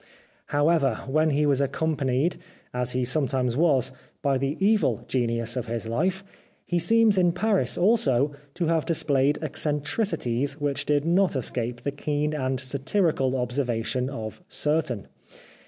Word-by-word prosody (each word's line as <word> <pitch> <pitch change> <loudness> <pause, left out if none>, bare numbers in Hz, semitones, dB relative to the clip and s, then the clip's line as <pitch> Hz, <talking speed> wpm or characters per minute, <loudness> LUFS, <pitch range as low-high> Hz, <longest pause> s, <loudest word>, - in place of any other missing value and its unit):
However, 145 -4 +2
when 155 +4 +2
he 150 0 +2
was 140 -2 +2
accompanied, 145 +1 0 0.4
as 125 0 -2
he 125 0 0
sometimes 130 -2 +1
was, 135 -4 +2 0.3
by 135 -2 +2
the 140 +3 -2
evil 195 - +2
genius 115 -1 0
of 125 -1 -3
his 115 -1 -3
life, 180 +11 -1 0.4
he 175 - 0
seems 220 +3 +4
in 175 -2 +3
Paris, 180 - +1
also, 150 - +3 0.2
to 175 - -1
have 165 -1 +1
displayed 145 -4 +1
eccen 150 0 -2
tricities 145 - 0
which 145 0 -2
did 145 0 +2
not 180 0 +2
escape 120 -1 -2
the 140 - -1
keen 150 +1 -2
and 130 -3 -1
satirical 135 +1 0
observation 125 0 -1
of 110 +3 -7
certain. 150 - 0
140 Hz, 140 wpm, -25 LUFS, 125-160 Hz, 0.4 s, seems